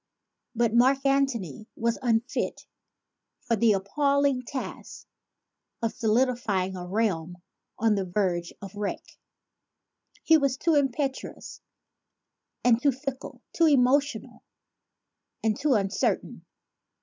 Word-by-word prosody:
But 230 -1 +1
Mark 265 +3 +3
Antony 240 - 0
was 230 0 -1
unfitted 235 0 -1 0.8
for 235 - 0
the 220 0 +4
appalling 280 +7 +1
task 255 +2 -7 0.8
of 225 - 0
solidifying 220 -5 0
a 180 -1 -6
realm 180 -4 -1 0.4
on 225 -1 +2
the 200 -2 0
verge 175 -2 -1
of 195 0 -8
wreck. 205 -1 -5 1.0
He 320 -1 +5
was 275 -2 0
too 330 +3 +1
impetuous 275 -1 -2 1.0
and 240 -1 +4
too 280 - +4
fickle, 270 0 -7
too 330 - +4
emotional 285 +1 +2 1.0
and 220 -1 +2
too 285 0 +1
uncertain. 195 -1 -1
235 Hz, 105 wpm, -27 LUFS, 205-275 Hz, 1.0 s, He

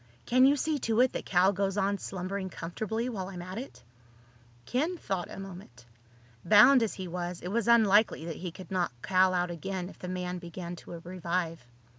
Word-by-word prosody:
Can 255 +2 +5
you 285 - +5
see 300 +1 -1
to 225 -2 0
it 255 - +3
that - - -5
Cal 185 +2 +4
goes 195 +1 -1
on 200 0 +1
slumbering 190 +1 -4
comfortably 220 +8 -3
while 195 -7 -4
I'm 180 -2 -7
at 185 +4 -6
it?" 265 - -10 0.8
Ken 310 - -1
thought 190 - -3
a - - -8
moment. 180 - -10 0.6
Bound 225 +5 +7
as 225 - -1
he 190 -1 -6
was, 175 0 -4
it 180 - -5
was 230 +2 0
unlikely 215 -6 +4
that 165 -2 -5
he 180 - -5
could 180 +2 -12
knock 180 -8 0
Cal 185 0 +4
out 180 -1 0
again 185 +1 -4
if - - -15
the 180 - -6
man 180 0 -3
began 175 0 -7
to 170 0 -9
revive. 170 -4 -3
185 Hz, 195 wpm, -29 LUFS, 175-215 Hz, 0.8 s, Bound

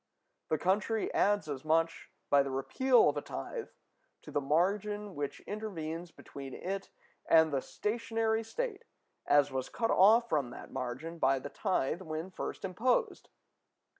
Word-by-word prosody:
The 155 - +2
country 210 +6 0
adds 205 -4 +2
as 140 -3 -4
much, 165 +1 +1 0.2
by 140 - +7
the 140 - -2
repeal 245 - +3
of - - +1
a - - -1
tithe, 475 -2 -5 0.6
to - - -10
the 145 - 0
margin 200 +7 0
which 145 -3 -4
intervenes 175 -6 -5
between 140 -4 -9
it 195 +1 -4 0.4
and 160 -2 +6
the 135 - +1
stationary 225 - -1
state 435 - -4 0.4
as 145 -1 +4
was 130 -1 -3
cut 225 -1 0
off 225 +5 +6
from 145 - 0
that 120 - -10
margin 130 +7 -5
by 135 -1 +3
the 140 +2 -6
tithe 185 -9 -1
when 160 +3 -5
first 185 - -5
imposed. 230 +7 0
175 Hz, 150 wpm, -32 LUFS, 145-215 Hz, 0.6 s, by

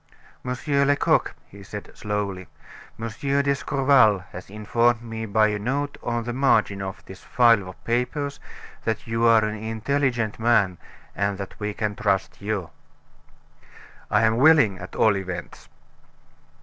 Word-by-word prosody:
Monsieur 130 +3 0
Lecoq," 140 0 +2
he 100 - -14
said, 105 +1 -9
slowly, 100 -3 -3 0.5
"Monsieur 140 +5 -1
d'Escorval 135 -7 +3
has 90 +1 -9
informed 115 +3 +1
me 115 -1 -5
by 110 +1 +3
a 105 0 -2
note 140 +6 -2
on 120 -1 -2
the 120 +1 -4
margin 115 -6 +2
of 95 0 -7
this 95 -1 -11
file 115 -6 +3
of 95 - -14
papers 125 +4 -2 0.4
that 110 -1 -2
you 115 0 -2
are 115 -1 +5
an 105 - -2
intelligent 115 0 -1
man, 105 -6 +2 0.4
and 100 0 -1
that 100 -1 -7
we 105 0 -2
can 105 -2 -2
trust 100 -2 -1
you." 100 -4 -3 1.4
"I - - +3
am 110 0 +3
willing, 135 - +5
at 90 - -9
all 110 -2 +4
events." 90 -2 -6
110 Hz, 140 wpm, -24 LUFS, 100-125 Hz, 1.4 s, are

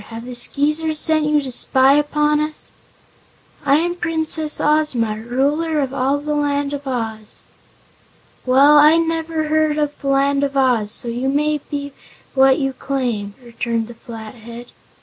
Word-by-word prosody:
Have 230 +1 -9
the 250 - -7
Skeezers 300 +5 +1
sent 310 0 +4
you 300 -1 +1
to 260 - -6
spy 265 +2 +3
upon 295 +1 +1
us?" 305 0 -4 0.9
"I 275 - +3
am 340 +3 0
Princess 320 -3 -2
Ozma, 260 -8 0
Ruler 285 +7 -1
of 270 -2 -2
all 275 +1 0
the 300 +1 -4
Land 285 -1 -1
of 285 -1 -6
Oz." 225 -4 -5 1.0
"Well, 280 +4 +5
I've 320 +3 +5
never 325 -1 -2
heard 310 -1 +1
of 295 -1 -3
the 275 - -5
Land 275 +1 +1
of 280 0 -2
Oz, 245 -6 +2
so 235 - -2
you 245 +3 -2
may 300 +2 0
be 285 -1 -5 0.4
what 265 -1 +4
you 270 -2 -2
claim," 240 -7 -3
returned 235 -1 -3
the 240 - -10
Flathead. 230 +1 -11
280 Hz, 155 wpm, -19 LUFS, 245-300 Hz, 1.0 s, Well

